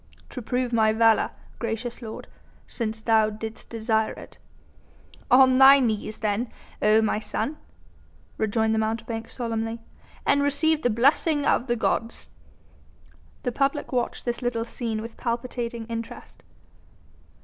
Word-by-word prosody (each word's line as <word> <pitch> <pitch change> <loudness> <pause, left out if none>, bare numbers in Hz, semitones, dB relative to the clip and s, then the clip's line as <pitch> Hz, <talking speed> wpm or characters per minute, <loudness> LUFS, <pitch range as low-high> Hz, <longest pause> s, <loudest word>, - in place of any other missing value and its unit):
"To 250 - -6
prove 245 +1 -1
my 220 -1 +4
valour, 225 0 +4 0.3
gracious 230 +1 -4
lord, 220 -2 -8 0.4
since 220 -2 -4
thou 220 -1 +3
didst 220 +1 -7
desire 220 -1 0
it." - - -13 0.9
"On 260 0 +6
thy 270 +1 +9
knees 220 -3 -1
then, 215 +3 -1 0.3
O 215 +1 +4
my 215 0 +1
son!" 220 +6 -3 0.8
rejoined 220 +1 +1
the 220 - +1
mountebank 225 +1 -3
solemnly, 225 -1 -3 0.5
"and 285 - +3
receive 300 +2 +2
the 245 - +2
blessing 285 +6 +2
of 245 - +2
the 240 - +1
gods." 230 0 -2 1.1
The 245 - -1
public 275 +3 -1
watched 245 -2 -2
this 240 0 -2
little 240 -2 -1
scene 225 -2 -4
with 230 0 -9
palpitating 235 -1 -3
interest. 230 0 -7
230 Hz, 130 wpm, -25 LUFS, 220-250 Hz, 1.1 s, thy